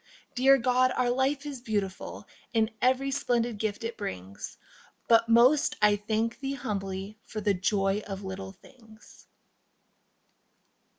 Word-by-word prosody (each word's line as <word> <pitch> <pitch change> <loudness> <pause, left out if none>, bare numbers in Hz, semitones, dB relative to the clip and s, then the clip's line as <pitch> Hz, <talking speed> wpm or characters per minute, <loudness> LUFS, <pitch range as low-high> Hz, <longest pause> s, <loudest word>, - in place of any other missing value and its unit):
Dear 270 +2 +5
God, 255 0 +3
our 245 -1 +2
life 270 +3 0
is 280 -4 -6
beautiful 205 -5 -3 0.3
In 225 -1 +2
every 260 +2 +2
splendid 240 -5 0
gift 215 +2 -2
it 230 0 -4
brings, 95 - -6 0.5
But 230 0 +4
most 250 +6 +5
I 210 -1 +5
thank 220 +3 -2
Thee 275 0 -3
humbly 195 -3 -4
for 215 - -6
The 205 -1 +2
joy 195 +2 +1
of 195 0 -6
little 190 0 -6
things. 220 0 -19
225 Hz, 130 wpm, -28 LUFS, 200-255 Hz, 0.5 s, Dear